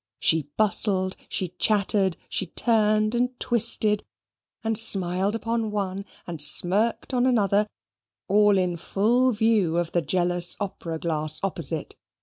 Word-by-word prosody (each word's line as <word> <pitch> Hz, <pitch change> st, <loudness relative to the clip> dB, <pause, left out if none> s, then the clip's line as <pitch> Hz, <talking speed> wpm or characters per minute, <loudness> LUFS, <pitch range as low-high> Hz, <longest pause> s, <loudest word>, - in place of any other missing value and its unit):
She 160 Hz, -3 st, +2 dB
bustled, 195 Hz, -3 st, +2 dB
she 185 Hz, -, -2 dB
chattered, 200 Hz, -3 st, +1 dB
she 190 Hz, -, -2 dB
turned 215 Hz, +1 st, +1 dB
and 245 Hz, +1 st, -1 dB
twisted, 220 Hz, -3 st, 0 dB, 0.6 s
and 225 Hz, 0 st, -1 dB
smiled 195 Hz, -1 st, +2 dB
upon 230 Hz, -1 st, -2 dB
one, 195 Hz, -1 st, -4 dB, 0.2 s
and 165 Hz, -4 st, -7 dB
smirked 190 Hz, -, +2 dB
on 250 Hz, 0 st, +2 dB
another, 210 Hz, -4 st, +2 dB, 0.6 s
all 205 Hz, 0 st, +4 dB
in 180 Hz, -2 st, -1 dB
full 235 Hz, +9 st, +1 dB
view 215 Hz, -7 st, +1 dB
of 175 Hz, -1 st, -1 dB
the 175 Hz, -, +1 dB
jealous 175 Hz, +2 st, +1 dB
opera 185 Hz, -5 st, -5 dB
glass 155 Hz, -2 st, -2 dB
opposite. 165 Hz, -5 st, -3 dB
200 Hz, 130 wpm, -24 LUFS, 175-220 Hz, 0.6 s, all